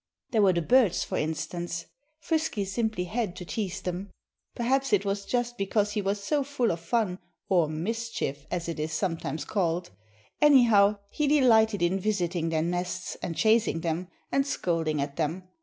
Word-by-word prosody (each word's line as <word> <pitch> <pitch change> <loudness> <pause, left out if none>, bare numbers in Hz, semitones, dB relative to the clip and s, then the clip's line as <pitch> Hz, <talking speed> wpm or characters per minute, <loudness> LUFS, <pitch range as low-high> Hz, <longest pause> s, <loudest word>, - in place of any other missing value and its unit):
There 225 -3 +3
were 195 -2 +5
the 170 -1 0
birds, 230 -2 +4
for - - -4
instance. 170 +2 -3 0.3
Frisky 315 -10 -1
simply 220 -1 -1
had 210 0 -2
to 180 - -7
tease 195 0 -3
them. 185 +2 -4 0.5
Perhaps 265 +1 +1
it 205 0 +3
was 200 0 -2
just 240 -1 -1
because 205 +1 +1
he 210 0 -1
was 200 +1 -2
so 290 +6 +1
full 265 -4 0
of 170 - -3
fun 185 +1 -1 0.3
or 175 -5 +3
mischief, 170 -4 -3
as 170 -1 -3
it 165 -2 -4
is 155 +1 -2
sometimes 165 -2 -2
called. 175 -3 -1 0.5
Anyhow, 230 -8 +6
he 300 - 0
delighted 225 -8 +4
in 180 +3 +2
visiting 180 -5 -1
their 160 -1 +1
nests; 180 +1 -3
and 165 - -3
chasing 220 -6 +3
them; 170 +2 -2 0.2
and 275 0 +2
scolding 165 - -1
at 140 0 -3
them. 165 +3 -1
195 Hz, 170 wpm, -28 LUFS, 170-230 Hz, 0.5 s, Anyhow